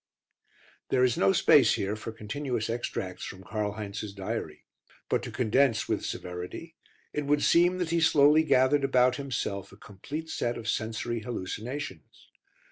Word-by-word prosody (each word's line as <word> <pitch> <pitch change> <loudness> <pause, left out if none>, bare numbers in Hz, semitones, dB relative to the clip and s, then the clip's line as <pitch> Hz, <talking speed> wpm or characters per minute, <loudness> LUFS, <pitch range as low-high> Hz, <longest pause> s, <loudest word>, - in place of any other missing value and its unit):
There 125 - +3
is 125 -2 +3
no 95 - +4
space - - +5
here 100 +2 -2
for 110 +1 -6
continuous 115 +1 -3
extracts 100 -6 -4
from 95 0 -8
Karl 105 +1 -2
Heinz's 105 -1 -6
diary. 95 -6 -5 0.4
But - - +1
to - - -7
condense 115 0 +2
with - - -1
severity, 90 - -6 0.4
it 150 -1 -2
would 145 0 +2
seem 175 +2 +4
that 175 -3 -2
he 170 0 +2
slowly 150 0 +6
gathered 140 -1 +3
about 125 -2 +3
himself 120 -8 -3
a 95 - -15
complete 140 +12 -7
set 120 0 -1
of 115 - -7
sensory 115 +1 -2
hallucinations. 110 - -6
120 Hz, 150 wpm, -28 LUFS, 105-140 Hz, 0.4 s, slowly